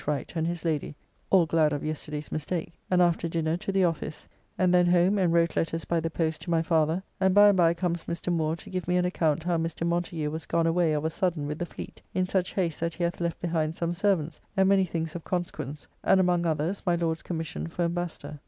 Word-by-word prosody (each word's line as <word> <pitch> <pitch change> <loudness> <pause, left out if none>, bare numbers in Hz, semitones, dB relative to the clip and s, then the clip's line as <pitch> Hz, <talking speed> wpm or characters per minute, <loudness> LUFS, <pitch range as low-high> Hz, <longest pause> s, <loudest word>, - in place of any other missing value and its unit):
Wright 145 -3 -2
and 160 0 0
his 170 0 -4
lady, 150 -2 -1 0.3
all 185 -3 +5
glad 160 -1 +3
of 145 - -2
yesterday's 150 -1 -5
mistake, 160 +3 -3 0.2
and 180 -1 +4
after 170 -1 +1
dinner 165 -1 0
to 195 +2 -3
the 195 -1 +2
office, 165 -2 -2 0.3
and 180 -1 +3
then 180 -1 +5
home 180 +3 +4
and 180 -3 +3
wrote 170 -1 +2
letters 165 0 -1
by 170 - +1
the 165 0 -2
post 160 -1 -1
to - - -7
my 165 -1 +2
father, 160 +2 +1 0.2
and 190 0 +3
by 205 0 +8
and 200 - +3
by 170 -2 +5
comes 170 -1 -2
Mr. 170 +1 -2
Moore 160 -1 0
to 165 - -12
give 185 -2 -3
me 180 0 +2
an 180 - +2
account 160 -4 +1
how 175 0 +1
Mr. 165 0 -2
Montagu 170 -3 -1
was 160 0 -5
gone 170 0 +1
away 165 -1 +2
of 150 0 -1
a 160 - 0
sudden 175 -5 -1
with 150 +1 -4
the 175 - -2
fleet, - - -9
in 185 - +2
such 185 -1 -1
haste 170 -5 0
that 165 0 -2
he 175 - -3
hath 170 0 -1
left 170 -1 -2
behind 160 -2 -1
some 170 0 -1
servants, 170 -5 0 0.2
and 190 0 +5
many 195 -1 +4
things 165 -2 -3
of 170 - -5
consequence; 155 -5 -4 0.2
and 190 - +5
among 175 -2 +2
others, 160 +5 -1
my 175 -2 +2
Lord's 165 -1 -1
commission 160 - -4
for 175 - -2
Embassador. 170 -3 -3
170 Hz, 240 wpm, -27 LUFS, 160-180 Hz, 0.3 s, by